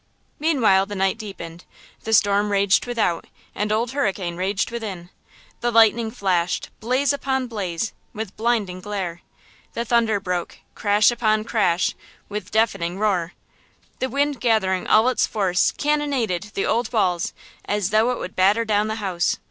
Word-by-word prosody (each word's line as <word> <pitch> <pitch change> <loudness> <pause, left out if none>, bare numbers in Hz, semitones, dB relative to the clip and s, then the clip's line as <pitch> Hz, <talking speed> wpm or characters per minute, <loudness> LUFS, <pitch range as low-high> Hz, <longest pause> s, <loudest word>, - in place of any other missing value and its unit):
Meanwhile 230 -11 +3
the 205 - -6
night 195 +3 0
deepened, 175 -5 -8 0.4
the 220 - -2
storm 205 -1 +3
raged 200 +2 +3
without 220 -8 -1 0.3
and 210 +1 -2
Old 230 +3 0
Hurricane 195 -10 -1
raged 190 +5 -1
within! 195 -7 -6 0.5
The 240 - 0
lightning 225 0 +4
flashed, 185 -6 -1
blaze 255 +5 +1
upon 265 -2 -1
blaze, 205 -4 -3 0.2
with 215 -2 -6
blinding 215 -6 -1
glare! 190 -4 -4 0.5
The 235 - -2
thunder 225 -3 +2
broke, 180 -3 -3 0.2
crash 210 +2 +3
upon 215 -2 +1
crash, 205 -6 +1 0.4
with 210 +1 -5
deafening 190 -6 0
roar! 190 -5 0 0.7
The 260 - -1
wind 285 -1 0
gathering 190 -6 +1
all 220 +3 +5
its 255 - +2
force 190 -4 +1
cannonaded 270 - -1
the 195 - 0
old 230 +1 0
walls 180 -7 +1 0.3
as 205 -1 -1
though 220 +3 +3
it 250 - -1
would 185 - -7
batter 205 +5 +3
down 210 -1 +1
the 220 - -2
house! 180 -2 0
210 Hz, 150 wpm, -22 LUFS, 190-235 Hz, 0.7 s, all